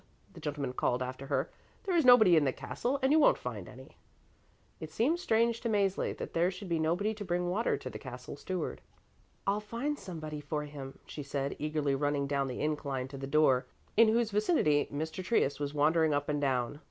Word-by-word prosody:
the - - -11
gentleman 140 -3 -3
called 125 0 0
after 130 +2 -6
her. 140 +1 -1 0.3
"There 375 -3 -1
is 335 - +4
nobody 235 -8 +8
in 155 - +5
the 135 - +2
castle, 250 - -2
and 265 - +4
you 315 - +6
won't 295 - +5
find 110 -7 -6
any." 130 +1 -14 0.8
It 160 - -6
seemed 255 - +1
strange 230 -5 +2
to 235 - -1
Mäzli 200 -3 0
that - - -6
there 170 +2 +3
should 190 0 -8
be 165 -1 +1
nobody 175 +7 +1
to 210 -1 -7
bring 175 -1 -1
water 220 +6 +1
to - - -8
the - - -6
Castle 125 0 -8
Steward. 185 +5 -4 0.6
"I'll 200 +1 +1
find 235 +8 -3
somebody 155 -5 -6
for 150 +1 -3
him," 140 -2 -8
she 150 - -7
said, 140 0 -3
eagerly 150 -2 0
running 145 0 0
down 140 -1 0
the 125 - -4
incline 140 -4 -2
to 135 - -8
the 135 - -5
door, 140 -3 +3 0.3
in 230 +1 +7
whose 225 0 +2
vicinity 200 - +2
Mr. 160 +5 -4
Trius 175 - +1
was 145 -1 -2
wandering 155 +1 +3
up 145 +1 -2
and 145 -1 0
down. 130 0 0
155 Hz, 205 wpm, -31 LUFS, 140-205 Hz, 0.8 s, nobody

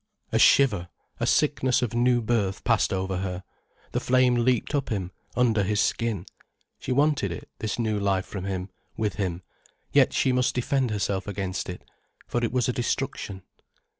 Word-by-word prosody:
A - - +2
shiver, 100 -11 +5 0.3
a - - 0
sickness 130 -4 +2
of 120 -2 -2
new 120 0 +3
birth 105 -4 0
passed 115 -2 +2
over 95 -1 -1
her, 90 -1 -4 0.5
the - - 0
flame 125 0 +3
leaped 120 +2 +1
up 140 -2 0
him, 95 -4 -2 0.2
under 115 -4 +3
his 105 +2 0
skin. 110 -6 0 0.5
She - - -5
wanted 145 - +2
it, 85 - -7
this 110 - -2
new 110 -3 0
life 95 -2 +1
from 95 -2 -6
him, 95 -1 -4 0.3
with 105 -2 -1
him, 90 -3 -2 0.5
yet - - +5
she 130 - +2
must 125 0 +1
defend 130 +1 +1
herself 100 -2 -1
against 95 -3 -3
it, 90 - -7 0.4
for 120 - -2
it 115 - 0
was 125 0 +1
a 125 - 0
destruction. 100 -5 -3
110 Hz, 170 wpm, -26 LUFS, 95-125 Hz, 0.5 s, shiver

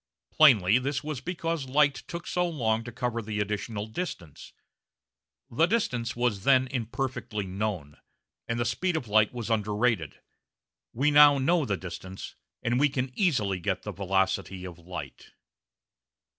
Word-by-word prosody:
Plainly 120 -8 +6
this 135 +1 -2
was 150 -4 -4
because 165 -3 -3
light 145 +1 +4
took 170 +6 -8
so 180 -1 0
long 115 -8 0
to 120 - -6
cover 120 -1 -2
the 105 -1 -4
additional 105 +1 -3
distance. 110 - -6 1.0
The 160 +8 +3
distance 125 - -1
was 120 -5 0
then 130 0 +5
imperfectly 120 -3 -3
known, 95 -6 -4 0.5
and 115 0 -2
the 120 - 0
speed 165 +9 0
of 125 - -5
light 105 0 +4
was 120 -2 -5
underrated. 105 - 0 0.7
We 140 +5 +1
now 145 -1 +8
know 155 +4 +2
the 100 -4 -1
distance, 95 +1 -8 0.3
and 120 +1 +1
we 150 - +5 0.3
easily 110 - +1
get 95 0 -2
the 105 - -4
velocity 95 -1 -1
of 90 -2 -9
light. 85 +1 -9
115 Hz, 145 wpm, -28 LUFS, 100-140 Hz, 1.0 s, now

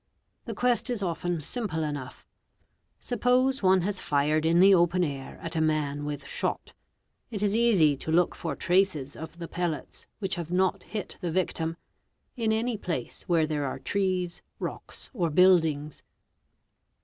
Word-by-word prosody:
The 230 -4 -5
quest 245 +2 +2
is 235 -5 -1
often 175 0 -1
sumple 160 - -2
enough; 145 -4 -7 0.7
suppose 250 +3 +1
one 190 -1 +4
has 195 +1 -1
fired 150 +2 +1
in 170 +1 +4
the 195 +2 +7
open 175 0 +3
air 140 -4 -5
at - - -5
a 160 - +1
man 150 -2 0
with 145 -1 -5
shot; - - -2 0.6
it 210 -3 -3
is 205 0 +2
easy 200 -11 +4
to 160 - -3
look 175 +2 +3
for - - -4
races 175 -7 +2
of 160 +1 -9
the 170 -1 -6
pellets 170 -3 -4
which 195 -3 -3
have 165 - -8
not 185 +2 +1
hit 210 0 -6
the 175 - -2
victim, 165 -1 -1 0.6
in 225 -3 0
any 225 +1 0
place 165 - -4
where 165 -3 +3
here 150 -2 -2
are 135 - -3
trees, 185 -3 -1 0.2
rocks, - - -7
or 175 -9 0
buildings. 160 -4 +3
175 Hz, 160 wpm, -27 LUFS, 155-200 Hz, 0.7 s, the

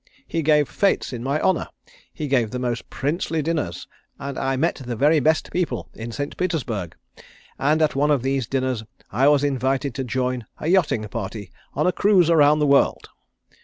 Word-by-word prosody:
He 165 - -1
gave 150 -2 +3
fêtes 200 -8 0
in 120 - -5
my 140 +3 0
honour. 185 -1 +1 0.4
He 150 - -5
gave 125 -5 +2
the 125 - -4
most 120 -2 -3
princely 155 +2 -2
dinners, 150 - -2 0.3
and 140 -1 -5
I 135 0 -1
met 150 +2 0
the 120 -1 -4
very 150 +6 +4
best 155 +3 +1
people 125 - -2
in 115 +1 -7
St. 145 +5 -4
Petersburg, 125 - -2 0.6
and 155 +3 +2
at 155 - +1
one 145 +2 +2
of 140 -5 +2
these 135 -3 0
dinners 130 -3 -1 0.3
I 130 +7 +3
was 145 -1 +4
invited 135 -1 0
to 135 - -3
join 125 -2 -2
a - - -7
yachting 155 - +2
party 105 -3 -6 0.2
on 150 - +1
a 180 - +4
cruise 185 -4 +3
around 150 -2 +5
the 150 - +2
world. 140 -1 +2
140 Hz, 185 wpm, -23 LUFS, 125-155 Hz, 0.6 s, around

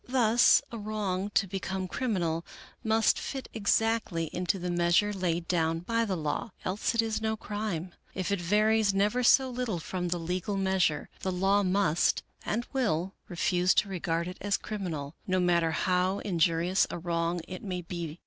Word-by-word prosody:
Thus 240 -2 +5
a 230 - -5
wrong, 205 -2 -2
to 200 - +4
become 190 0 -3
criminal, 175 -8 -1 0.4
must 220 0 +3
fit 270 -2 -5
exactly 215 -6 +1
into 180 +2 0
the 180 -1 -3
measure 175 +4 +2
laid 175 -3 -1
down 165 -2 +1
by 230 +5 0
the 195 -4 -1
law, 155 +6 -3
else 200 +5 -1
it 230 - +3
is 225 -1 -2
no 220 0 -1
crime; 205 -5 -4 0.2
if 185 +1 -2
it 200 -3 0
varies 210 +2 +3
never 210 +5 +2
so 260 +2 +5
little 245 -6 -2
from 180 +2 -3
the 175 0 -1
legal 180 +4 -2
measure, 190 -6 +1
the 190 - -2
law 195 +3 +2
must, 185 -4 +2 0.2
and 235 +3 -2
will, 195 -8 0 0.2
refuse 180 0 +2
to 200 - +2
regard 170 -2 -1
it 180 - -7
as 200 0 +1
criminal, 165 -9 -5
no 185 -1 +2
matter 170 -2 +3
how 185 +3 +1
injurious 175 -1 +2
a - - -4
wrong 170 0 -1
it 185 - -7
may 180 -3 -4
be. 170 -2 -5
185 Hz, 170 wpm, -29 LUFS, 175-210 Hz, 0.4 s, Thus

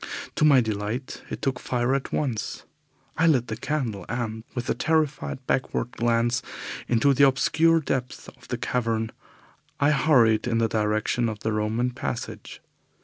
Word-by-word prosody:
To - - +2
my 140 -4 +7
delight 110 +4 -3
it - - -6
took 130 -2 0
fire 125 +1 0
at 135 -1 -2
once. 125 -8 -2 0.6
I 165 - +5
lit 130 -7 +3
the 110 - -2
candle, 120 -6 -2
and, 110 -2 -3
with 120 -1 -3
a - - +2
terrified 150 -1 -1
backward 125 -2 -1
glance 120 +1 +1 0.5
into 120 +4 +3
the 140 +1 +6
obscure 160 +5 +3
depths 130 -3 -3
of - - -15
the - - -3
cavern, 115 -2 -1 0.7
I 145 +1 +4
hurried 125 -7 +4
in 115 -2 +1
the 115 0 +3
direction 110 +2 0
of 110 -1 -6
the 110 - -1
Roman 110 +4 0
passage. 125 -1 -6
120 Hz, 155 wpm, -25 LUFS, 110-135 Hz, 0.7 s, my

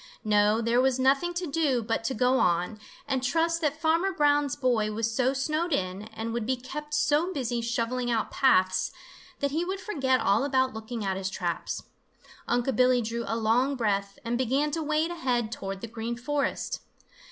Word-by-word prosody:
No, 210 +1 +3
there 235 +2 +3
was 260 -1 +2
nothing 275 +6 +2
to 355 +1 -2
do 285 -6 +1
but 225 0 -1
to 260 - -1
go 250 +3 +3
on, 180 +5 +1 0.3
and 265 -2 0
trust 330 +5 +1
that 300 0 0
Farmer 330 +4 +2
Brown's 290 -3 +2
boy 240 -6 +1
was 225 +1 -1
so 260 +1 +2
snowed 305 +5 -1
in 190 -4 -1
and 225 +1 -5
would 235 -2 -2
be 260 - +2
kept 295 +4 -6
so 310 +5 +2
busy 245 -7 -2
shovelling 235 +1 -1
out 230 -2 0
paths, 185 -8 +3 0.5
that 280 -1 +1
he 320 +4 0
would 380 +2 -3
forget 270 -10 +1
all 205 +5 +2
about 260 -2 +1
looking 220 0 -5
at 190 -1 -1
his 190 0 -2
traps. 175 -3 -3 0.6
Unc' 245 +1 +1
Billy 250 0 +4
drew 230 +1 -3
a 225 - -1
long 240 +5 +2
breath 200 -4 -1
and 240 +1 -1
began 270 +4 +1
to 325 +2 -2
wade 305 +2 0
ahead 245 -9 -1
toward 195 -3 -5
the 230 - -5
Green 230 +1 -4
Forest. 285 +4 -2
250 Hz, 185 wpm, -27 LUFS, 225-290 Hz, 0.6 s, Billy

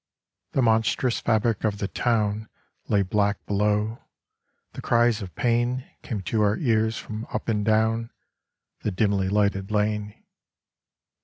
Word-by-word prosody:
The 135 - +2
monstrous 115 +2 +2
fabric 110 -1 +1
of 105 -2 0
the 100 - -2
town 110 -2 0 0.4
Lay 100 -1 +3
black 100 +1 0
below; 105 +2 0 0.7
the - - -7
cries 120 -1 +2
of 95 -3 -8
pain 120 +2 +1 0.2
Came 105 -5 -4
to 105 +5 0
our 105 +1 +2
ears 110 -4 +1
from 110 +1 -6
up - - -5
and 105 -3 +1
down 110 +1 +2 0.7
The - - -1
dimly 100 0 +1
lighted 100 -1 +1
lane. 105 0 -1
110 Hz, 135 wpm, -25 LUFS, 105-115 Hz, 0.7 s, Lay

